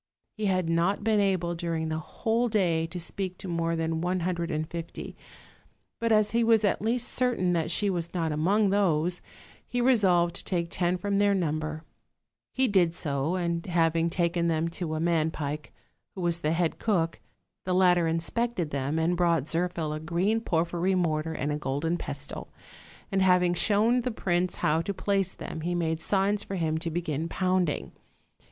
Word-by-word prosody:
He 215 Hz, -2 st, -1 dB
had 185 Hz, -3 st, +1 dB
not 170 Hz, +5 st, +1 dB
been 220 Hz, -1 st, +3 dB
able 185 Hz, -4 st, +1 dB
during 165 Hz, -2 st, -2 dB
the 155 Hz, 0 st, -2 dB
whole 230 Hz, +8 st, -1 dB
day 170 Hz, -7 st, +1 dB
to 175 Hz, +2 st, -6 dB
speak 185 Hz, +2 st, -4 dB
to -, -, -8 dB
more 165 Hz, -1 st, 0 dB
than 160 Hz, 0 st, -1 dB
one 180 Hz, +1 st, 0 dB
hundred 170 Hz, -1 st, -1 dB
and 155 Hz, +1 st, -2 dB
fifty; 170 Hz, 0 st, -7 dB, 0.8 s
but 230 Hz, 0 st, 0 dB
as 215 Hz, -1 st, +4 dB
he 235 Hz, 0 st, +2 dB
was 225 Hz, -1 st, +4 dB
at 205 Hz, -, +1 dB
least 235 Hz, +3 st, 0 dB
certain 235 Hz, -8 st, +1 dB
that 165 Hz, -2 st, 0 dB
she 205 Hz, +4 st, +1 dB
was 175 Hz, -3 st, -1 dB
not 165 Hz, -3 st, -1 dB
among 190 Hz, +7 st, +2 dB
those, 180 Hz, -3 st, +1 dB, 0.5 s
he 245 Hz, -, -2 dB
resolved 190 Hz, -9 st, +3 dB
to -, -, -7 dB
take 170 Hz, -3 st, -1 dB
ten 180 Hz, 0 st, 0 dB
from 200 Hz, +2 st, 0 dB
their 205 Hz, -1 st, +4 dB
number: 155 Hz, -3 st, -2 dB, 0.7 s
he 265 Hz, 0 st, +3 dB
did 180 Hz, -6 st, +3 dB
so, 145 Hz, +1 st, -1 dB
and 170 Hz, -1 st, -2 dB
having 165 Hz, -1 st, +2 dB
taken 170 Hz, 0 st, 0 dB
them 165 Hz, 0 st, +1 dB
to 165 Hz, -2 st, -4 dB
a -, -, -2 dB
man 165 Hz, -1 st, +2 dB
pike, 150 Hz, -1 st, -5 dB, 0.4 s
who 190 Hz, -, -5 dB
was 170 Hz, -1 st, 0 dB
the 155 Hz, -2 st, 0 dB
head 165 Hz, -1 st, 0 dB
cook, 170 Hz, -7 st, 0 dB, 0.4 s
the 185 Hz, -1 st, 0 dB
latter 180 Hz, -2 st, +4 dB
inspected 170 Hz, +2 st, -1 dB
them, 140 Hz, +2 st, -1 dB
and 165 Hz, +2 st, +1 dB
brought 170 Hz, -4 st, +2 dB
Zirphil 165 Hz, -1 st, -1 dB
a -, -, -4 dB
green 175 Hz, +8 st, 0 dB
porphyry 175 Hz, 0 st, 0 dB
mortar 160 Hz, -3 st, 0 dB
and 145 Hz, 0 st, -2 dB
a 150 Hz, -, -2 dB
golden 150 Hz, +4 st, -1 dB
pestle, -, -, -6 dB, 0.6 s
and, 195 Hz, -1 st, +1 dB
having 180 Hz, -1 st, +4 dB
shown 220 Hz, +6 st, +3 dB
the 250 Hz, -, -2 dB
prince 180 Hz, -5 st, 0 dB
how 155 Hz, +2 st, +1 dB
to 200 Hz, +3 st, -4 dB
place 195 Hz, -2 st, 0 dB
them, 160 Hz, -, -6 dB, 0.2 s
made 160 Hz, -1 st, -1 dB
signs 200 Hz, +2 st, +1 dB
for 195 Hz, -, -5 dB
him 160 Hz, -3 st, 0 dB
to 165 Hz, -, -3 dB
begin 165 Hz, -1 st, -2 dB
pounding. 185 Hz, -4 st, 0 dB
175 Hz, 180 wpm, -28 LUFS, 165-195 Hz, 0.8 s, as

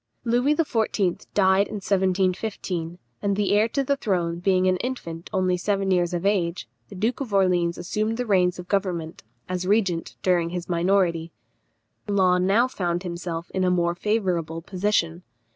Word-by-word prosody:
Louis 245 Hz, +5 st, +2 dB
XIV. 220 Hz, -, 0 dB
died 190 Hz, 0 st, +4 dB
in -, -, -7 dB
1715, 185 Hz, -3 st, -1 dB, 0.2 s
and 200 Hz, -1 st, 0 dB
the 205 Hz, 0 st, 0 dB
heir 210 Hz, +2 st, +4 dB
to 275 Hz, +4 st, 0 dB
the 280 Hz, +1 st, +1 dB
throne 175 Hz, -8 st, -1 dB
being 185 Hz, 0 st, +2 dB
an 185 Hz, 0 st, +3 dB
infant 175 Hz, -9 st, -5 dB
only 185 Hz, -2 st, +1 dB
seven 195 Hz, +1 st, 0 dB
years 175 Hz, -1 st, +2 dB
of 175 Hz, +1 st, -3 dB
age, 175 Hz, -9 st, 0 dB, 0.2 s
the -, -, -10 dB
Duke 220 Hz, +6 st, -1 dB
of 255 Hz, -6 st, -4 dB
Orleans 175 Hz, -3 st, +2 dB
assumed 215 Hz, +5 st, -2 dB
the 250 Hz, -, -2 dB
reins 180 Hz, -4 st, +2 dB
of 180 Hz, 0 st, -8 dB
government, 180 Hz, -5 st, -2 dB, 0.3 s
as 180 Hz, 0 st, -3 dB
regent, 195 Hz, -5 st, +1 dB
during 175 Hz, -2 st, +2 dB
his 175 Hz, 0 st, -5 dB
minority. 170 Hz, -2 st, +1 dB, 0.8 s
Law 185 Hz, -3 st, +3 dB
now 200 Hz, +7 st, +3 dB
found 175 Hz, -7 st, -2 dB
himself 170 Hz, -1 st, -5 dB
in 190 Hz, -, -1 dB
a 185 Hz, -, +3 dB
more 170 Hz, -1 st, +1 dB
favourable 175 Hz, -5 st, -1 dB
position. 180 Hz, -3 st, 0 dB
185 Hz, 160 wpm, -24 LUFS, 175-205 Hz, 0.8 s, died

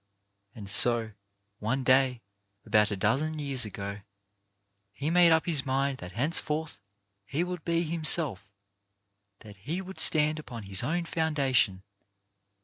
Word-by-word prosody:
And 105 Hz, -3 st, -10 dB
so, 115 Hz, +2 st, +5 dB, 0.5 s
one 130 Hz, +5 st, -2 dB
day 130 Hz, -2 st, +2 dB, 0.4 s
about 105 Hz, -1 st, +2 dB
a 100 Hz, -, -4 dB
dozen 135 Hz, +11 st, -1 dB
years 135 Hz, -5 st, -1 dB
ago, 100 Hz, 0 st, -7 dB, 0.9 s
he 145 Hz, +8 st, -4 dB
made 175 Hz, -1 st, +5 dB
up 160 Hz, 0 st, +2 dB
his 155 Hz, -6 st, +1 dB
mind 135 Hz, 0 st, -2 dB
that 90 Hz, +1 st, -10 dB
henceforth 150 Hz, -, -3 dB, 0.4 s
he 140 Hz, +11 st, -3 dB
would 180 Hz, -2 st, -6 dB
be 170 Hz, 0 st, -1 dB
himself 155 Hz, -, +2 dB, 0.5 s
— 100 Hz, 0 st, -53 dB
that 105 Hz, -2 st, -14 dB
he 150 Hz, -, -5 dB
would 190 Hz, 0 st, -10 dB
stand 155 Hz, 0 st, +5 dB
upon 120 Hz, -7 st, -9 dB
his 95 Hz, -1 st, 0 dB
own 170 Hz, +7 st, -2 dB
foundation. 135 Hz, -, -1 dB
135 Hz, 140 wpm, -27 LUFS, 105-155 Hz, 0.9 s, so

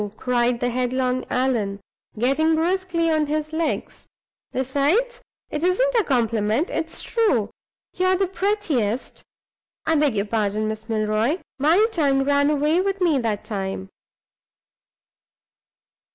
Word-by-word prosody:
cried 245 Hz, -1 st, +1 dB
the 245 Hz, 0 st, 0 dB
headlong 255 Hz, +1 st, 0 dB
Allan, 230 Hz, -6 st, 0 dB, 0.4 s
getting 275 Hz, +8 st, +2 dB
briskly 335 Hz, 0 st, 0 dB
on 310 Hz, -1 st, +1 dB
his 310 Hz, +1 st, -2 dB
legs. 325 Hz, 0 st, -3 dB, 0.4 s
"Besides, 290 Hz, -, 0 dB, 0.3 s
it 300 Hz, -, -3 dB
isn't 375 Hz, +9 st, +2 dB
a 460 Hz, -3 st, +3 dB
compliment; 230 Hz, -, 0 dB
it's 325 Hz, 0 st, -4 dB
true. 265 Hz, -, +1 dB, 0.4 s
You 370 Hz, -, 0 dB
are 375 Hz, -, +4 dB
the 385 Hz, +1 st, +1 dB
prettiest 350 Hz, -, -1 dB, 0.6 s
I 320 Hz, -, +2 dB
beg 290 Hz, -6 st, +2 dB
your 200 Hz, 0 st, 0 dB
pardon, 215 Hz, 0 st, -1 dB
Miss 220 Hz, +1 st, -5 dB
Milroy! 215 Hz, +6 st, +1 dB, 0.2 s
my 330 Hz, +10 st, +4 dB
tongue 280 Hz, -7 st, +2 dB
ran 285 Hz, +1 st, +3 dB
away 300 Hz, +4 st, +2 dB
with 390 Hz, 0 st, -1 dB
me 335 Hz, -7 st, +2 dB
that 220 Hz, -4 st, -2 dB
time." 195 Hz, -2 st, -4 dB
280 Hz, 125 wpm, -23 LUFS, 230-335 Hz, 0.6 s, are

